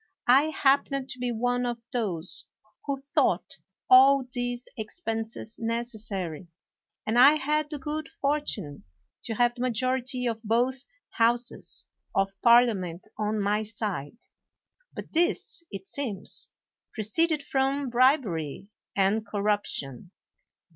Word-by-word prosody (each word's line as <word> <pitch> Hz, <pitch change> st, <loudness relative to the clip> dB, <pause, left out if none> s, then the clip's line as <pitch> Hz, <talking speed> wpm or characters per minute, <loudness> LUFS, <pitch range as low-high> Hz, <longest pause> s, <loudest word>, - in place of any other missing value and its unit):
I 265 Hz, +4 st, +6 dB
happened 275 Hz, -3 st, +1 dB
to 255 Hz, -, -6 dB
be 245 Hz, 0 st, -1 dB
one 245 Hz, +2 st, 0 dB
of 240 Hz, -1 st, -1 dB, 0.2 s
those 190 Hz, -8 st, -2 dB, 0.4 s
who 275 Hz, -1 st, -1 dB
thought 275 Hz, +1 st, 0 dB, 0.3 s
all 265 Hz, +1 st, +7 dB
these 245 Hz, -1 st, -2 dB
expenses 225 Hz, -2 st, -4 dB
necessary, 220 Hz, -, -3 dB, 0.6 s
and 225 Hz, +3 st, +2 dB
I 280 Hz, +4 st, +9 dB
had 300 Hz, +1 st, 0 dB
the 300 Hz, -, -4 dB
good 305 Hz, +1 st, -4 dB
fortune 275 Hz, -, -2 dB, 0.4 s
to 225 Hz, -, -3 dB
have 240 Hz, +1 st, +3 dB
the 240 Hz, -, -8 dB
majority 255 Hz, +1 st, 0 dB
of 225 Hz, -2 st, -1 dB
both 245 Hz, +4 st, +1 dB, 0.3 s
houses 235 Hz, +2 st, 0 dB, 0.3 s
of 195 Hz, 0 st, +1 dB
Parliament 215 Hz, -7 st, +4 dB
on 215 Hz, 0 st, 0 dB
my 205 Hz, +1 st, +1 dB
side. 210 Hz, -6 st, -4 dB, 0.7 s
But -, -, -9 dB
this, 345 Hz, +1 st, +1 dB
it 195 Hz, -1 st, -7 dB
seems, 225 Hz, -9 st, -4 dB, 0.4 s
proceeded 290 Hz, +8 st, +1 dB
from 270 Hz, 0 st, 0 dB
bribery 220 Hz, -, +2 dB, 0.3 s
and 200 Hz, +3 st, +2 dB
corruption. 205 Hz, -, -2 dB
240 Hz, 115 wpm, -27 LUFS, 210-265 Hz, 0.7 s, I